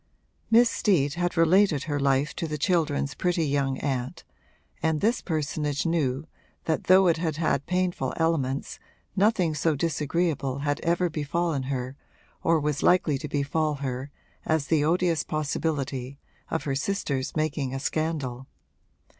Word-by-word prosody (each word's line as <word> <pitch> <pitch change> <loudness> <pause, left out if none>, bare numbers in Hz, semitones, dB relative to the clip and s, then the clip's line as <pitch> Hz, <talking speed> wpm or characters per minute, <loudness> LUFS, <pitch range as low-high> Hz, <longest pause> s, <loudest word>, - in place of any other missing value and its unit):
Miss 235 +2 +6
Steet 160 -11 +1
had 175 +1 -2
related 165 -2 +4
her 145 -3 -2
life 140 +1 +1
to 170 - -2
the 150 -1 -3
children's 150 -3 +1
pretty 175 0 0
young 140 -2 0
aunt 130 -3 -3 0.6
and 160 -1 +1
this 230 +6 +1
personage 150 -3 -2
knew 155 -4 0 0.4
that 160 - -1
though 190 +1 +6
it 170 -2 +3
had 160 -3 -2
had 155 -4 0
painful 180 -7 0
elements 145 -5 -1 0.4
nothing 190 -5 +2
so 155 +1 +1
disagreeable 150 -3 -1
had 145 0 0
ever 170 +2 +1
befallen 160 -1 -1
her 130 -1 -3 0.5
or 165 -1 +3
was 150 -1 -1
likely 160 -6 +3
to 150 - -5
befall 150 +2 0
her 135 -1 -4 0.3
as 160 -2 0
the 155 -1 +2
odious 170 +1 +2
possibility 140 -3 -2 0.3
of 165 - -2
her 140 - -1
sister's 140 -4 -2
making 155 -4 -1
a 135 - -3
scandal. 140 -4 -2
155 Hz, 145 wpm, -26 LUFS, 140-170 Hz, 0.6 s, Miss